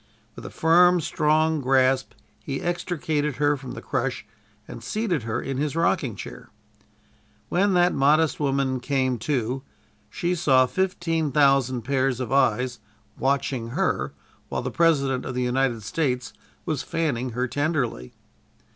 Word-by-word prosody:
With - - -8
a - - -7
firm, 175 +2 +4
strong 155 0 +1
grasp 130 0 +2 0.3
he 135 +2 -3
extricated 160 -4 -2
her 145 +1 +2
from 130 -2 -8
the - - -8
crush 130 -1 -2 0.4
and 115 - -9
seated 185 - -1
her 110 - -1
in 135 -1 -4
his 150 +1 -1
rocking 165 - +1
chair. 95 - -9 1.0
When 195 +2 +2
that 175 0 +4
modest 150 +3 +3
woman 135 -2 0
"came 130 -1 0
to," 130 0 -1 0.5
she 175 +11 -1
saw 135 -7 +4
fifteen 165 -1 -1
thousand 135 -3 +3
pairs 130 0 0
of 125 -3 -4
eyes 125 -2 +2 0.4
watching 135 -3 0
her 70 - 0 0.4
while - - -3
the 130 - -3
President 140 -3 +2
of 130 - -5
the 125 - 0
United 125 -2 0
States 125 +1 -2 0.3
was 155 -4 -1
fanning 130 -7 -2
her 125 +2 -1
tenderly. 135 - -2
135 Hz, 140 wpm, -24 LUFS, 125-160 Hz, 1.0 s, firm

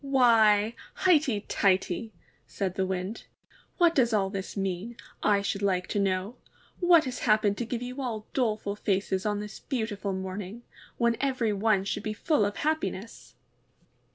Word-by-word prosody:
'Why, 225 -5 +4 0.2
highty 300 - +3
tighty!'' 195 +2 0 0.4
said 190 -3 -3
the 190 0 -1
Wind. 190 +3 -4 0.5
^What 345 -2 +5
does 240 -6 +2
all 195 -2 +1
this 195 0 -5
mean, 195 +4 -3 0.2
I 200 -1 +3
should 200 0 -2
like 185 -2 +1
to 205 - 0
know? 195 +4 -1 0.4
What 350 -3 +6
has 255 -1 -4
happened 215 -2 +3
to 240 - -1
give 240 0 -3
you 250 +3 -5
all 225 -4 -4
doleful 215 -5 0
faces 195 -1 -1
on 205 -1 -1
this 210 0 -8
beautiful 220 -6 -3
morning, 190 +4 -5 0.3
when 235 -1 +2
every 255 -6 +1
one 205 -1 +2
should 200 - -3
be 215 +1 -3
full 295 - +1
of 205 - -2
happiness?' 230 -9 -3
210 Hz, 155 wpm, -28 LUFS, 195-240 Hz, 0.5 s, What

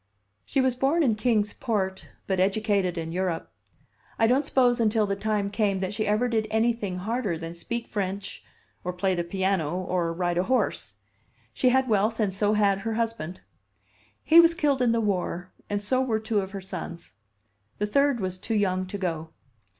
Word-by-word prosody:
"She 275 - +1
was 260 -1 +1
born 275 +6 +2
in 245 -6 +3
Kings 215 -1 +1
Port, 195 -6 -2 0.2
but 190 -2 -1
educated 195 -2 +1
in 165 0 -3
Europe. 180 -2 -2 0.7
I 225 - +4
don't 265 +5 +2
suppose 245 -3 +3
until 220 -1 +3
the 200 -1 -1
time 205 -1 -1
came 205 -2 +1
that 190 +1 -2
she 215 +1 -2
ever 215 +4 +2
did 220 -2 0
anything 220 -4 0
harder 210 -2 -2
than 165 +1 -6
speak 235 +7 -5
French, 200 -1 -4 0.4
or 180 - -3
play 185 +1 0
the 175 -1 -1
piano, 185 -3 0
or 180 -2 -1
ride 175 0 -1
a 180 - +1
horse. 260 +4 0 0.6
She 255 - +3
had 260 +1 +3
wealth 220 +1 +1
and 205 -3 +1
so 205 +2 +1
had 200 -2 +3
her 225 +2 -3
husband. 225 -7 -3 0.8
He 325 +1 +7
was 335 0 +6
killed 285 -4 +1
in 245 -2 +3
the 230 0 +1
war, 180 -3 -2 0.2
and 205 0 -2
so 255 +5 +1
were 230 -4 0
two 220 -1 0
of 190 - -6
her 195 0 -6
sons. 170 -2 -7 0.7
The 210 - 0
third 275 +4 +2
was 185 -2 -3
too 225 - -2
young 185 -3 +1
to 200 - -5
go. 165 -4 -3
205 Hz, 190 wpm, -26 LUFS, 185-230 Hz, 0.8 s, He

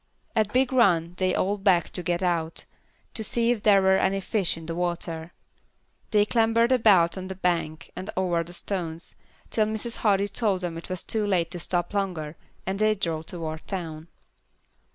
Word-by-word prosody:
At 215 -2 +2
Big 260 +2 +2
Run 175 -9 +3
they 185 -1 +1
all 200 +2 0
begged 185 -4 +2
to 180 - +1
get 175 +1 -1
out, 165 -2 -1 0.5
to 220 - -3
see 235 +2 +2
if 235 -4 -1
there 200 -2 +5
were 190 0 +5
any 195 +1 +1
fish 195 -4 -1
in 165 - -9
the 165 - -4
water. 170 -1 -3 0.8
They 210 -1 +4
clambered 230 +2 +3
about 195 -8 +4
on 185 - -6
the 190 - -5
bank 170 -4 -1
and 185 +3 -6
over 175 -3 +1
the 170 - -11
stones, 175 -3 -4 0.4
till 215 -1 +2
Mrs. 220 +2 -3
Hardy 200 -2 +2
told 205 -3 0
them 175 -2 -3
it 165 - -8
was 185 -1 -3
too 215 -2 -1
late 175 -4 +1
to 180 - -4
stop 175 +2 -2
longer, 175 -6 -2 0.3
and 190 +1 -2
they 215 0 +3
drove 165 -5 -3
toward 160 -2 -5
town. 165 -4 -5
185 Hz, 185 wpm, -26 LUFS, 170-210 Hz, 0.8 s, there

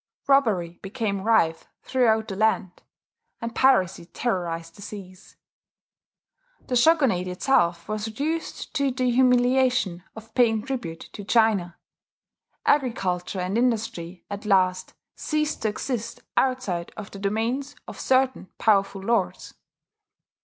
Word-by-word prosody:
Robbery 210 -12 +2
became 200 -1 -3
rife 170 -7 +2 0.2
throughout 225 -4 +2
the 195 - -5
land; 210 -3 0 0.6
and 230 0 -5
piracy 190 -11 +3
terrorized 170 -8 -3
the - - -14
seas. 190 -3 -10 1.3
The 250 - -2
shogunate 245 - +3
itself 180 -3 +1
was 215 0 -3
reduced 300 +9 -4
to 280 -3 +1
the 255 -1 0
humiliation 250 -6 +3
of 220 0 -12
paying 225 -4 +3
tribute 170 -12 -5
to 205 - -7
China. 205 -5 +2 0.9
Agriculture 195 -9 0
and 190 +5 -1
industry 210 -8 -2
at 200 0 -6
last 185 -3 +1 0.2
ceased 305 0 -1
to - - +1
exist 230 +1 -4
outside 255 -10 0
of 210 -2 -8
the 200 - -9
domains 230 +8 -2
of - - -9
certain 260 -5 +1
powerful 195 -2 +2
lords. 230 +4 -1
220 Hz, 115 wpm, -25 LUFS, 185-255 Hz, 1.3 s, piracy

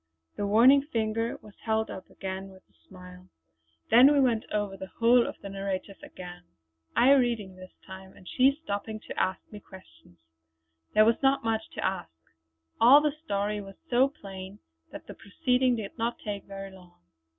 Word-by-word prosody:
The 205 - -2
warning 245 +7 +6
finger 225 -4 -2
was 210 - -14
held 220 0 -1
up 185 - -9
again 190 0 -6
with 190 0 -17
a - - -35
smile. 180 0 -14 0.6
Then 250 +5 +8
we 290 - +3
went 240 -5 +2
over 205 -2 -2
the 190 - -8
whole 235 +1 +4
of - - -7
the 200 - -6
narrative 195 0 -5
again, 180 -1 -10 0.5
I 250 +3 +5
reading 235 -8 +1
this 185 0 -13
time 190 0 -11
and 180 - -17
she 270 +3 +2
stopping 215 -2 -4
to - - -9
ask 185 0 0
me 210 - -9
questions. 90 - -17 0.8
There 215 - +6
was 230 +1 +2
not 270 -1 +2
much 220 -1 -2
to - - -3
ask; 80 - -2 0.7
all 250 +5 +8
the 300 0 0
story 205 -4 -2
was 195 -1 -11 0.2
so 250 +2 +4
plain 195 -6 -10 0.3
that - - -10
the - - -9
proceeding 250 +4 0
did 215 -4 -6
not 235 +1 -1
take 205 -2 -6
very 195 0 -8
long. 180 -2 -17
210 Hz, 175 wpm, -28 LUFS, 190-235 Hz, 0.8 s, Then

